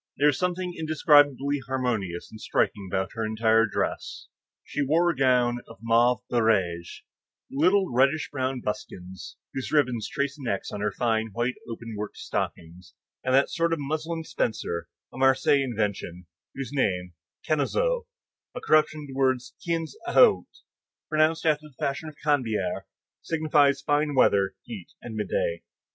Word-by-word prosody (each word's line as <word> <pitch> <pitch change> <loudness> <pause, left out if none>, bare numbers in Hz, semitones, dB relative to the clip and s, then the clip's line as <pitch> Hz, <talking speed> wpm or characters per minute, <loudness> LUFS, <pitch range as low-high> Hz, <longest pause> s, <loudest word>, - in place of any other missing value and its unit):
There 145 - +2
was 145 - -1
something 180 0 -1
indescribably 145 -3 +3
harmonious 115 -10 -2
and 110 0 -11
striking 100 -3 0
about 95 -1 -1
her 115 - -3
entire 110 +1 +3
dress. - - -3 0.3
She 145 - -3
wore 165 +5 +3
a - - -6
gown 125 -2 +3
of 115 - -12
mauve 115 +1 +3
barège, 95 -8 0 0.5
little 185 +7 +3
reddish 140 +5 +2
brown 130 -2 -2
buskins, 95 -4 -6 0.2
whose 135 - -4
ribbons 125 -7 +1
traced 140 0 -2
an 130 - -6
X 100 - -2
on 105 - -5
her 105 0 0
fine, 110 0 0
white, 120 +4 0 0.2
open 115 0 -7
worked 105 0 -6
stockings, 90 +2 -5 0.3
and 130 0 +2
that 135 - +3
sort 165 -1 +1
of 165 - -1
muslin 155 +3 -3
spencer, 85 - -2 0.3
a 130 - -8
Marseilles 135 +1 +4
invention, 100 -7 -3 0.3
whose 135 -1 -5
name, 90 -9 0 0.3
canezou, 480 - +1 0.5
a - - -3
corruption 155 -5 +2
of 145 - -9
the - - -8
words 130 -1 0
quinze 165 -2 -2
août, 480 -4 +5 0.6
pronounced 155 +1 +2
after 155 -1 +1
the 145 - -20
fashion 140 +3 -2
of 155 - -14
the - - -23
Canebière, 115 -10 0 0.4
signifies 150 -4 +2
fine 145 0 +1
weather, 100 -6 +3
heat, 105 -7 -9
and 120 - -7
midday. 95 -5 -1
130 Hz, 155 wpm, -26 LUFS, 110-150 Hz, 0.6 s, août